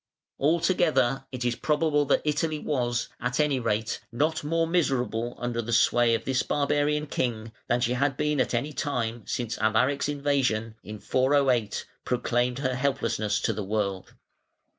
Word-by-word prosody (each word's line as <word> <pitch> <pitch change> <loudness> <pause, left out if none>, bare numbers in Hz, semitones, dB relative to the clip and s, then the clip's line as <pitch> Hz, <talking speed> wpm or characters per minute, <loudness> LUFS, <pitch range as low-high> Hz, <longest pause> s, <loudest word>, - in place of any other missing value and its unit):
Altogether 155 -4 +2
it 125 -2 -4
is 120 -1 +1
probable 150 0 +1
that 140 - +2
Italy 155 +1 0
was, 120 -6 -1
at 125 +1 -2
any 150 -3 +2
rate, 110 -1 -1
not 155 +7 0
more 165 +2 +1
miserable 125 -8 0
under 120 -1 -2
the 115 +1 -5
sway 115 +1 +4
of - - -5
this 130 -1 +1
barbarian 145 +1 0
king 115 -6 -2 0.2
than 120 - +2
she 120 0 +1
had 135 +2 0
been 150 -2 +1
at - - 0
any 145 +6 -2
time 120 -5 -2
since 120 -2 -3
Alaric's 125 +7 +2
invasion, 135 -6 0
in 105 0 -7
408, 130 -5 +1 0.2
proclaimed 125 0 0
her 130 -2 -1
helplessness 115 -5 0
to 115 - 0
the 105 0 -4
world. 100 -2 -3
125 Hz, 155 wpm, -27 LUFS, 115-145 Hz, 0.2 s, sway